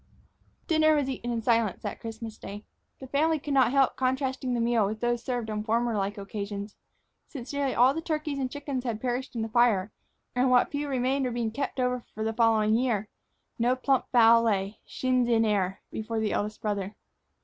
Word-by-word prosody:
Dinner 310 -2 +4
was 285 -3 +1
eaten 245 -2 -3
in 230 -1 -2
silence 230 -5 +1
that - - -4
Christmas 225 -1 -7
day. 205 +2 -8 0.3
The 265 - -9
family 310 +5 +1
could 285 0 -4
not 265 -3 +5
help 270 0 +3
contrasting 260 -1 -1
the - - 0
meal 230 -1 +2
with 215 +2 -4
those 240 0 0
served 245 -3 -2
on 210 0 -2
former 230 +1 0
like 200 +1 -2
occasions. 200 0 -5 0.5
Since 265 -2 -8
nearly 280 -2 0
all 255 +3 +5
the 325 - -3
turkeys 305 -3 -2
and 260 -1 -1
chickens 280 -2 -4
had 230 -4 -3
perished 250 +2 -3
in 225 - -1
the 225 - -4
fire, 220 -4 +3 0.4
and 255 +1 +3
what 250 -1 +4
few 290 0 -2
remained 265 0 0
were 250 - -1
being 235 -2 -2
kept 275 +3 -3
over 250 -1 0
for 215 - -3
the 225 0 -1
following 220 -2 +3
year, 225 -4 0 0.5
no 245 +2 +3
plump 265 0 0
fowl 230 -1 +6
lay, 205 -2 -1
shins 255 -1 +1
in 225 -1 +3
air, 195 -3 0
before 220 +1 -3
the 220 -1 0
eldest 210 +1 -2
brother. 205 -1 -2
240 Hz, 200 wpm, -28 LUFS, 220-260 Hz, 0.5 s, fowl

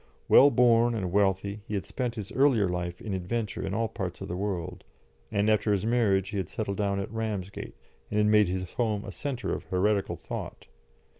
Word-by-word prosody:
Well 140 - +8
born 120 -2 +4
and 95 -5 -2
wealthy, 100 +1 +1
he 105 - -3
had 100 - -2
spent 125 -3 -3
his 105 -1 -6
earlier 130 -7 +3
life 90 -1 -3
in 105 - -4
adventure 95 +3 -3
in 95 - -2
all 115 +1 +1
parts - - -5
of - - -6
the 90 - -3
world, 95 -3 -3 0.5
and 100 +1 +1
after 110 0 +3
his 100 0 +1
marriage 105 -5 +2
he 105 - -4
had 95 - -2
settled 100 -3 -3
down 100 -1 0
at 100 - -4
Ramsgate, 105 -4 -4 0.3
and 105 - -2
had 105 - +4
made 105 -1 +5
his 90 0 -3
home 110 -4 -1
a - - -6
centre 135 -4 -3
of - - -5
heretical 100 +2 +1
thought. - - -7
105 Hz, 205 wpm, -28 LUFS, 95-115 Hz, 0.5 s, Well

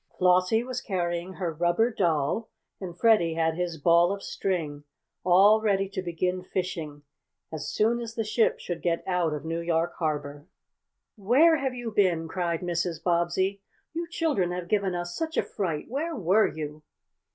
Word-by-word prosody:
Flossie 185 +5 +3
was 255 0 -4
carrying 175 -1 -2
her 180 -3 -3
rubber 175 +9 +2
doll, 170 +2 0 0.3
and 180 -3 -7
Freddie 190 -7 +3
had 160 0 +1
his 170 -1 -3
ball 170 +3 +4
of 200 0 -4
string, 155 -6 -3 0.4
all 195 +5 +6
ready 195 -2 +1
to 195 -1 -4
begin 180 +1 -2
fishing 165 -5 -4 0.5
as 155 - -4
soon 230 +3 +1
as 230 -1 -6
the 225 - -1
ship 220 +2 +1
should 175 - -5
get 170 -1 0
out 180 -3 0
of 150 +1 -5
New 165 +1 -2
York 170 0 0
Harbor. 145 -2 -3 0.7
"Where 270 - +5
have 265 -3 -2
you 240 -2 -5
been?" 180 -6 +2
cried 170 -1 -2
Mrs. 170 -2 -2
Bobbsey. 180 +3 +1 0.3
"You 335 +1 -3
children 310 - 0
have 180 -1 -4
given 200 -3 +1
us 175 0 -4
such 320 -1 -3
a - - +3
fright! 165 -7 -3
Where 315 +6 -3
were 205 0 +3
you?" 150 -1 -6
180 Hz, 165 wpm, -27 LUFS, 170-210 Hz, 0.7 s, all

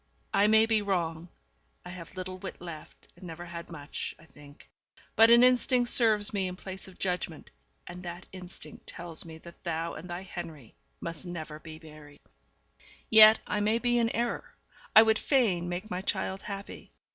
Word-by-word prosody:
I 205 - +4
may 220 +1 +6
be 225 -1 +2
wrong; 170 -4 -2 0.6
I - - -8
have 180 -1 -10
little 185 0 -5
wit 190 0 -7
left, 170 -3 -10
and - - -16
never 175 0 -8
had 170 -1 -8
much, 150 -3 -6
I 160 - -18
think; 145 -2 -17 0.5
but 225 +1 +7
an 235 +1 +8
instinct 250 -1 +4
serves 215 -3 +3
me 195 -2 0
in 180 - -5
place 190 0 -8
of 190 - -14
judgement, 180 -2 -3 0.3
and 175 +1 -9
that 175 0 -7
instinct 185 -1 -5
tells 170 -1 -8
me 160 -1 -10
that 170 +1 -15
thou 165 -1 -2
and 175 +3 -9
thy 175 +2 -5
Henri 160 - -8 0.3
must 170 +1 -6
never 155 -3 -6
be 155 0 -10
married. 150 -2 -14 0.9
Yet 220 0 +9
I 210 - -1
may 215 +2 +2
be 240 0 +1
in 230 -1 +2
error. 235 0 -3 0.4
I 220 - +11
would 220 -1 +3
fain 195 - +2
make 185 +5 -5
my 180 - -2
child 190 0 -2
happy. 200 -1 -8
180 Hz, 180 wpm, -29 LUFS, 170-215 Hz, 0.9 s, I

